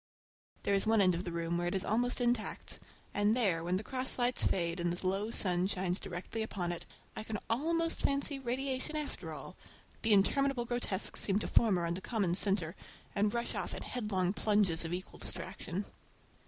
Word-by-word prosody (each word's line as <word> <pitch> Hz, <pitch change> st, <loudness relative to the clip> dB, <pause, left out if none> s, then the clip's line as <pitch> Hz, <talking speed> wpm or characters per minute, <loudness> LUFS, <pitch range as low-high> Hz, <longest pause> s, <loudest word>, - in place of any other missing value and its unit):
There 200 Hz, -, +1 dB
is 195 Hz, +1 st, +2 dB
one 225 Hz, 0 st, +4 dB
end 185 Hz, -2 st, +5 dB
of 175 Hz, +2 st, -3 dB
the 175 Hz, -, -3 dB
room 170 Hz, 0 st, -1 dB
where 175 Hz, -, 0 dB
it 175 Hz, -, -1 dB
is 190 Hz, -, +1 dB
almost 245 Hz, +4 st, +2 dB
intact, 240 Hz, -2 st, 0 dB, 0.3 s
and 205 Hz, +3 st, +3 dB
there, 185 Hz, -9 st, +2 dB
when 180 Hz, +2 st, +1 dB
the 200 Hz, -, -4 dB
cross 260 Hz, +3 st, -2 dB
lights 245 Hz, 0 st, +3 dB
fade 170 Hz, -1 st, +1 dB
and 175 Hz, 0 st, +1 dB
the 175 Hz, +2 st, -3 dB
low 195 Hz, +3 st, 0 dB
sun 180 Hz, -5 st, +2 dB
shines 185 Hz, -1 st, 0 dB
directly 190 Hz, +4 st, -4 dB
upon 185 Hz, -5 st, -2 dB
it, 170 Hz, -, -6 dB, 0.3 s
I -, -, -3 dB
can 215 Hz, 0 st, -4 dB
almost 330 Hz, +7 st, +1 dB
fancy 280 Hz, 0 st, +2 dB
radiation 265 Hz, +3 st, -2 dB
after 300 Hz, -1 st, -4 dB
all,—the 225 Hz, -, -6 dB
interminable 245 Hz, +5 st, +3 dB
grotesques 235 Hz, -5 st, -1 dB
seem 195 Hz, -1 st, +2 dB
to 215 Hz, -, -1 dB
form 215 Hz, -5 st, +4 dB
around 170 Hz, +1 st, -1 dB
a -, -, -16 dB
common 200 Hz, -5 st, 0 dB
centre 190 Hz, -3 st, +2 dB, 0.4 s
and 205 Hz, 0 st, +2 dB
rush 235 Hz, +1 st, -2 dB
off -, -, -3 dB
in -, -, -3 dB
headlong 195 Hz, -6 st, -1 dB
plunges 205 Hz, -7 st, +3 dB
of 165 Hz, -, -4 dB
equal 180 Hz, +1 st, -5 dB
distraction. 195 Hz, +3 st, -4 dB
205 Hz, 190 wpm, -33 LUFS, 180-240 Hz, 0.4 s, end